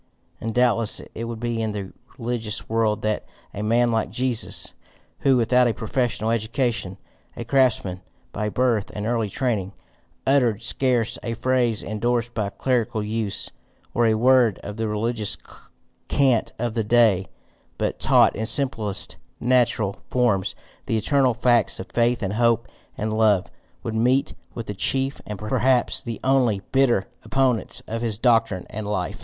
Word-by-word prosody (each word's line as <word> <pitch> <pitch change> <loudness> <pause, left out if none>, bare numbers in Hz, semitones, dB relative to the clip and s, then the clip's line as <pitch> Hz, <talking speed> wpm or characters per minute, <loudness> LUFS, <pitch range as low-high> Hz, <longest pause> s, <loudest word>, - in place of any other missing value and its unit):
And 115 0 -4
doubtless 115 -3 +3
it 115 - -5
would 115 -1 -5
be 120 -1 -2
in 110 -1 -2
the 100 -2 -6 0.2
religious 115 -3 -3
world 110 -2 0
that 110 0 0 0.3
a 105 - -5
man 120 +3 +2
like 110 -3 0
Jesus, 120 +2 -1 0.5
who, 135 -2 +3
without 125 +1 +4
a 115 - 0
professional 115 -1 -1
education, 115 -3 -1 0.4
a 120 - -5
craftsman 115 -8 +1 0.3
by 105 +1 -2
birth 115 -3 +1
and 105 - -3
early 115 -2 0
training, 105 -5 -1 0.5
uttered 125 -6 +2
scarce 120 -2 0
a 115 0 -3
phrase 120 -2 +1
endorsed 120 +3 -1
by 105 -3 -1
clerical 115 -3 -1
use, 105 -1 -2 0.4
or 120 -1 +3
a 110 - +3
word 120 -2 +4
of 105 - -6
the 110 0 -1
religious 110 0 -1 0.7
cant 130 -5 +2
of 120 -1 -2
the 115 -1 0
day, 105 -4 +3 0.5
but - - -2
taught - - +4
in 110 +1 -2
simplest 115 -8 -1 0.2
natural 120 -5 +1
forms 115 -7 +1 0.3
the 115 - +1
eternal 130 +1 +2
facts 120 -2 +3
of 95 - -5
faith 120 0 +2
and 95 0 -1
hope 115 0 +2 0.3
and 110 +1 -2
love, 110 -4 +3 0.4
would 115 - -3
meet 125 +6 +2 0.2
with 115 - -5
the 105 - -4
chief 135 +7 0
and 105 - -5
perhaps 120 +4 +1
the 115 -4 -6
only 125 -7 +2
BITTER 130 -7 +3 0.2
opponents 130 -4 0
of 115 +1 -4
his 115 -3 -1
doctrine 115 -5 +2
and 105 -1 -5
life. 100 -4 -2
115 Hz, 155 wpm, -23 LUFS, 105-125 Hz, 0.7 s, without